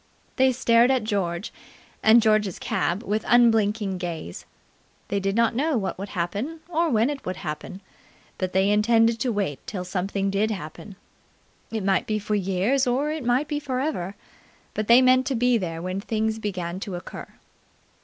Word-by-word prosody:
They 260 Hz, 0 st, +5 dB
stared 235 Hz, -1 st, +4 dB
at 260 Hz, -4 st, +2 dB
George 195 Hz, -4 st, -2 dB, 0.5 s
and 225 Hz, +1 st, +6 dB
George's 215 Hz, -4 st, +2 dB
cab 185 Hz, +6 st, -1 dB
with 215 Hz, +1 st, -1 dB
unblinking 215 Hz, -4 st, +3 dB
gaze. 165 Hz, -, -6 dB, 0.6 s
They 200 Hz, -, 0 dB
did 195 Hz, 0 st, -1 dB
not 230 Hz, 0 st, +3 dB
know 285 Hz, +3 st, +1 dB
what 195 Hz, -3 st, -3 dB
would 200 Hz, +1 st, -5 dB
happen 210 Hz, -, -3 dB
or 335 Hz, -1 st, +1 dB
when 225 Hz, -2 st, +3 dB
it 285 Hz, -, -6 dB
would 185 Hz, -, -3 dB
happen, 155 Hz, +6 st, -6 dB, 0.6 s
but 185 Hz, -1 st, -2 dB
they 190 Hz, +2 st, +2 dB
intended 225 Hz, +2 st, +3 dB
to 245 Hz, +2 st, 0 dB
wait 195 Hz, -, -2 dB
till 185 Hz, -3 st, -4 dB
something 195 Hz, +2 st, -2 dB
did 205 Hz, +2 st, +1 dB
happen. 195 Hz, 0 st, -7 dB, 0.7 s
It 220 Hz, -3 st, -3 dB
might 195 Hz, -1 st, +1 dB
be 215 Hz, -, 0 dB
for 210 Hz, 0 st, -3 dB
years 205 Hz, +7 st, +1 dB
or 275 Hz, +5 st, +1 dB
it 310 Hz, -2 st, -4 dB
might 245 Hz, +5 st, +1 dB
be 295 Hz, -1 st, -2 dB
for 265 Hz, -3 st, -3 dB
ever, 205 Hz, -, -3 dB, 0.6 s
but 215 Hz, -1 st, -3 dB
they 240 Hz, +2 st, +7 dB
meant 255 Hz, 0 st, +4 dB
to 270 Hz, -, 0 dB
be 245 Hz, 0 st, +3 dB
there 165 Hz, -3 st, -4 dB
when 185 Hz, +2 st, -3 dB
things 220 Hz, 0 st, -1 dB
began 185 Hz, -4 st, -4 dB
to 195 Hz, -2 st, -5 dB
occur. 175 Hz, -, -8 dB
215 Hz, 175 wpm, -24 LUFS, 190-245 Hz, 0.7 s, they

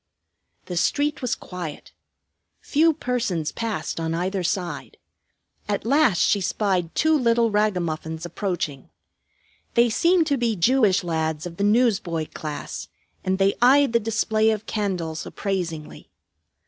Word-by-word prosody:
The 180 Hz, -, -5 dB
street 290 Hz, -, +1 dB
was 250 Hz, -2 st, 0 dB
quiet. 175 Hz, -5 st, -8 dB, 0.7 s
Few 320 Hz, +3 st, +3 dB
persons 245 Hz, -, -2 dB
passed 225 Hz, -6 st, -3 dB
on 165 Hz, 0 st, -1 dB
either 185 Hz, +3 st, -1 dB
side. 180 Hz, 0 st, -3 dB, 0.7 s
At 205 Hz, 0 st, -1 dB
last 270 Hz, -, +3 dB
she 200 Hz, -, +3 dB
spied 185 Hz, -3 st, -1 dB
two 315 Hz, 0 st, +3 dB
little 235 Hz, -4 st, +2 dB
ragamuffins 175 Hz, -6 st, -1 dB
approaching. 175 Hz, -6 st, -4 dB, 0.9 s
They 235 Hz, 0 st, +4 dB
seemed 340 Hz, +7 st, +3 dB
to 285 Hz, -3 st, +1 dB
be 235 Hz, -3 st, 0 dB
Jewish 205 Hz, 0 st, +3 dB
lads 160 Hz, -2 st, -2 dB
of 170 Hz, -1 st, -7 dB
the 200 Hz, -, -1 dB
newsboy 205 Hz, -8 st, +2 dB
class, 150 Hz, -2 st, -6 dB, 0.4 s
and 190 Hz, 0 st, 0 dB
they 195 Hz, 0 st, +3 dB
eyed 270 Hz, +1 st, +5 dB
the 235 Hz, -, +4 dB
display 220 Hz, 0 st, +1 dB
of 215 Hz, 0 st, -1 dB
candles 180 Hz, -7 st, -2 dB
appraisingly. 175 Hz, -6 st, -4 dB
200 Hz, 130 wpm, -24 LUFS, 170-235 Hz, 0.9 s, eyed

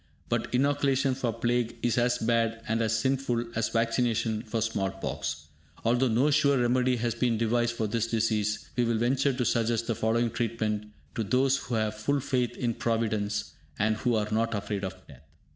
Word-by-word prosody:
But -, -, -1 dB
inoculation 135 Hz, 0 st, +2 dB
for 125 Hz, -2 st, -1 dB
plague 120 Hz, 0 st, -1 dB
is 120 Hz, -2 st, +2 dB
as 120 Hz, +1 st, +2 dB
bad 115 Hz, -1 st, 0 dB
and 115 Hz, +1 st, 0 dB
as 110 Hz, 0 st, +1 dB
sinful 125 Hz, -1 st, 0 dB
as 110 Hz, -1 st, 0 dB
vaccination 115 Hz, -1 st, 0 dB
for 115 Hz, 0 st, -3 dB
small 110 Hz, -3 st, 0 dB
pox. 75 Hz, -6 st, -4 dB, 0.4 s
Although 120 Hz, +3 st, +3 dB
no 125 Hz, +6 st, +3 dB
sure 140 Hz, -1 st, +4 dB
remedy 125 Hz, +1 st, +2 dB
has 120 Hz, -1 st, -1 dB
been 120 Hz, -1 st, +1 dB
devised 120 Hz, +1 st, +1 dB
for 110 Hz, -, -1 dB
this 115 Hz, +2 st, -1 dB
disease, 110 Hz, -2 st, 0 dB
we 125 Hz, -, +2 dB
will 115 Hz, -1 st, +1 dB
venture 130 Hz, +4 st, +2 dB
to 125 Hz, -1 st, -1 dB
suggest 115 Hz, -1 st, +1 dB
the 115 Hz, -, 0 dB
following 115 Hz, +2 st, +1 dB
treatment 110 Hz, -2 st, -2 dB, 0.3 s
to 115 Hz, -, -1 dB
those 130 Hz, +6 st, +2 dB
who 125 Hz, -3 st, -4 dB
have 110 Hz, -1 st, 0 dB
full 140 Hz, +7 st, 0 dB
faith 125 Hz, -3 st, -1 dB
in 120 Hz, -2 st, 0 dB
Providence, 110 Hz, -5 st, -1 dB, 0.3 s
and 110 Hz, +1 st, +1 dB
who 120 Hz, 0 st, +1 dB
are 105 Hz, -1 st, 0 dB
not 115 Hz, +1 st, +1 dB
afraid 100 Hz, -1 st, -3 dB
of 95 Hz, -1 st, -3 dB
death. 70 Hz, -4 st, -15 dB
115 Hz, 185 wpm, -28 LUFS, 110-125 Hz, 0.4 s, sure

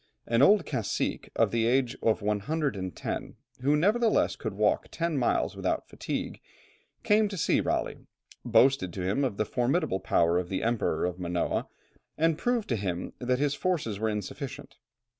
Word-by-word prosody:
An 115 Hz, +1 st, +2 dB
old 205 Hz, +7 st, +6 dB
cacique 115 Hz, -8 st, -2 dB
of -, -, +2 dB
the 115 Hz, -1 st, +1 dB
age 125 Hz, 0 st, +2 dB
of 110 Hz, -1 st, +1 dB
110, 105 Hz, -, -2 dB, 0.3 s
who 145 Hz, +3 st, +3 dB
nevertheless 215 Hz, +8 st, +2 dB
could 110 Hz, -4 st, -5 dB
still -, -, -13 dB
walk 105 Hz, -1 st, +2 dB
ten 170 Hz, -1 st, -2 dB
miles 125 Hz, -4 st, +1 dB
without -, -, -2 dB
fatigue, -, -, -5 dB, 0.6 s
came 210 Hz, +1 st, +4 dB
to 200 Hz, -1 st, -6 dB
see -, -, +2 dB
Raleigh, -, -, -2 dB, 0.4 s
boasted 120 Hz, -5 st, +3 dB
to 95 Hz, -, -4 dB
him 100 Hz, +10 st, 0 dB
of 120 Hz, -7 st, -1 dB
the 110 Hz, -, +1 dB
formidable 125 Hz, -, 0 dB
power 85 Hz, -1 st, +2 dB
of 90 Hz, -1 st, -5 dB
the 95 Hz, -, -2 dB
Emperor 115 Hz, -9 st, 0 dB
of 90 Hz, 0 st, -3 dB
Manoa, 85 Hz, -1 st, -1 dB, 0.5 s
and 165 Hz, 0 st, +3 dB
proved 240 Hz, +5 st, 0 dB
to 120 Hz, -, +1 dB
him 90 Hz, -3 st, -3 dB
that 125 Hz, 0 st, 0 dB
his 145 Hz, +1 st, +1 dB
forces 145 Hz, -, -1 dB
were 110 Hz, 0 st, 0 dB
insufficient. 135 Hz, -, -6 dB
120 Hz, 165 wpm, -28 LUFS, 100-150 Hz, 0.6 s, old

